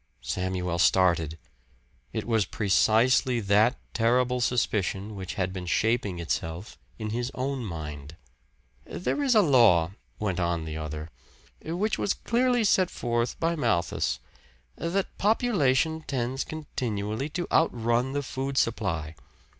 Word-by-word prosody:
Samuel 90 +4 -2
started. 85 -4 +3 0.7
It 110 - -3
was 110 -4 +2
precisely 120 +3 +3
that 105 +3 +3 0.2
terrible 125 +2 +2
suspicion 105 -4 0
which 95 -1 -6
had 95 -2 -1
been 90 -2 -6
shaping 110 -1 +1
itself 85 +2 -4 0.2
in 110 -1 -4
his 120 +2 -2
own 130 0 -2
mind. 75 -5 -7 0.7
"There 290 - -2
is 265 -4 +3
a 215 - +6
law," 115 - +5 0.3
went 95 -4 -2
on 85 -2 0
the 80 -1 -5
other, 75 0 -5 0.5
"which 190 +7 -1
was 200 - +1
clearly 245 0 +1
set 190 -3 +3
forth 120 0 -2
by 165 +1 +1
Malthus, 110 - 0 0.6
that 185 +4 -2
population 160 - +2
tends 130 0 -1
continually 120 -5 -3
to 175 - -1
outrun 120 -3 +2
the 145 0 -1
food 135 +1 -4
supply. 90 -11 0
115 Hz, 125 wpm, -27 LUFS, 90-135 Hz, 0.7 s, a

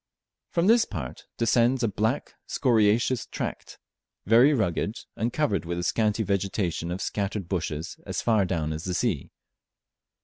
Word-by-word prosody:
From 170 0 +1
this 230 +3 +6
part 75 - -7
descends 120 +2 +3
a - - +3
black 110 +6 -1
scoriaceous 115 0 +2
tract; - - -5 0.5
very 120 +7 +6
rugged, 110 - 0 0.2
and 115 +2 -1
covered 145 -7 0
with 85 +1 -3
a 85 - -2
scanty 110 +2 +1
vegetation 95 -4 -1
of 90 +2 -3
scattered 100 -2 -2
bushes 80 -4 -3
as - - -3
far 110 -4 +3
down 80 -4 -1
as 80 +1 -6
the 90 -1 -2
sea. 95 - -1
105 Hz, 145 wpm, -26 LUFS, 90-120 Hz, 0.5 s, this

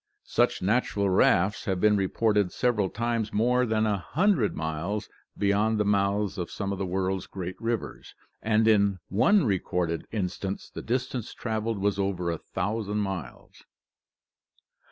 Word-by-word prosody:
Such - - +1
natural 100 -1 +1
rafts 95 +2 +3
have 95 -2 -1
been 105 +2 +4
reported 105 0 +1
several 110 -6 +1
times 115 -1 -2
more 125 +3 +2
than 110 0 +1
a 105 -2 +1
hundred 160 - +1
miles 80 +7 -3 0.3
beyond 105 +2 +2
the 105 - +2
mouths 100 0 +1
of 85 - -3
some 100 -1 -4
of 100 - -3
the 95 - -2
world's 95 0 -1
great 90 -1 -6
rivers 115 -2 -4 0.3
and 110 0 +2
in 100 -3 +4
one 185 - +4
recorded 90 -5 -1
instance 95 -1 -3
the - - -6
distance 125 -1 -3
traveled 110 -1 -2
was 100 0 0
over 90 -3 -1
a 85 - -4
thousand 105 +1 -3
miles! 95 -3 -5
105 Hz, 145 wpm, -27 LUFS, 95-110 Hz, 0.3 s, been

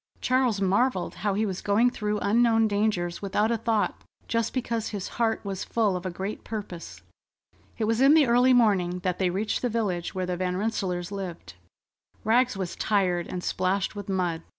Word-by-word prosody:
Charles 255 -5 +1
marvelled 200 +1 +1
how 200 -1 0
he 215 +2 +1
was 190 -3 -4
going 225 +5 +3
through 210 -3 -2
unknown 225 +1 +3
dangers 205 -4 -1
without 205 +3 +1
a 230 - +1
thought, 225 -2 0 0.2
just 230 -1 0
because 230 -3 -2
his 200 -3 -4
heart 225 -2 -1
was 195 -2 -3
full 215 -5 +1
of 180 +1 -4
a - - -2
great 190 +4 -5
purpose. 200 -6 -7 0.7
It 225 - -2
was 225 +3 +1
in 275 +3 +7
the 310 -3 +6
early 245 +2 +4
morning 195 -7 +3
that 180 -1 -1
they 185 -2 +2
reached 205 +4 -1
the 245 - 0
village 200 -7 -2
where 185 -1 -1
the 180 0 -3
Van 180 0 -1
Rensselaers 190 -4 -2
lived. 180 - -6 0.7
Rags 240 0 +2
was 185 -3 -4
tired 180 -5 +1
and 180 -1 -5
splashed 190 +2 -1
with 205 -1 -7
mud. 180 -4 -1
205 Hz, 185 wpm, -26 LUFS, 185-225 Hz, 0.7 s, in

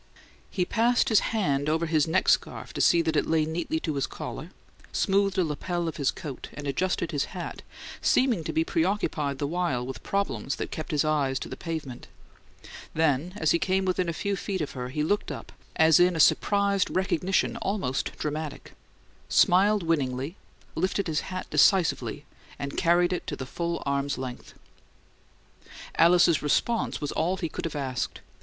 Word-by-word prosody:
He 180 -3 -1
passed 235 +6 +2
his 220 - +6
hand 145 -10 0
over 160 +2 +1
his 155 -2 +2
neck 160 - +1
scarf - - +1
to - - -2
see 170 -1 +5
that 160 -1 -1
it - - +1
lay 160 -1 +2
neatly 160 0 -2
to 155 - -2
his 140 -2 -1
collar, - - -7 0.4
smoothed 195 0 +1
a 185 - +4
lapel 170 +3 -2
of 160 -1 -4
his 140 -3 +1
coat, 145 -7 -6
and 145 - -7
adjusted 170 +4 -1
his 145 -3 0
hat, - - -6 0.4
seeming 245 -10 +2
to - - -2
be 160 - +1
preoccupied 165 -5 0
the 145 - -2
while 140 -6 -1
with 130 +1 -7
problems 140 - -2
that - - -5
kept 155 - -5
his 150 0 +1
eyes 145 -4 +1
to - - -6
the - - -5
pavement; 155 -8 -6 0.9
then, 160 +2 +1
as 160 -7 +2
he 170 - +3
came 190 +1 +1
within 185 -1 0
a - - +1
few 200 +5 -2
feet 195 0 -3
of 150 - -3
her, 125 -1 -5
he 150 +3 -2
looked 205 +7 0
up, - - -8 0.2
as 160 0 +6
in 180 0 +4
a - - -2
surprised 200 +4 +3
recognition 185 0 0
almost 190 -10 -2
dramatic, 150 0 -5 0.6
smiled 200 +2 +4
winningly, 140 -1 -1 0.4
lifted 190 +3 0
his 160 -3 0
hat 185 0 -4
decisively, 190 -5 +3 0.3
and 140 0 -5
carried 175 +1 +3
it 180 - -4
to - - -3
the 130 - -6
full 170 +5 -3
arm's 140 0 -1
length. 130 -1 -7 1.4
Alice's 170 -2 +5
response 225 +10 0
was 145 - -3
all 180 +4 0
he 170 - -2
could 155 - -6
have 165 - -4
asked. 130 -5 -3
165 Hz, 175 wpm, -27 LUFS, 145-185 Hz, 1.4 s, his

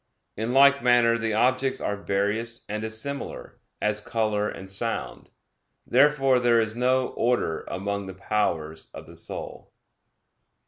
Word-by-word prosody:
In 110 +3 -2
like 140 +1 +6
manner 120 -1 +4
the 115 -1 -1
objects 130 +3 +2
are 105 - -2
various 105 +4 -2
and 105 +1 -4
dissimilar, 110 +6 -3 0.2
as 105 0 0
color 105 -1 -1
and 95 - -8
sound. 115 +4 -4 0.6
Therefore 135 -3 +4
there 120 -1 +4
is 110 -1 -1
no 130 +1 +1
order 115 -9 -1
among 100 +1 -3
the 95 - -8
powers 85 -6 -2
of - - -9
the - - -14
soul. - - -7
115 Hz, 135 wpm, -25 LUFS, 105-125 Hz, 0.6 s, like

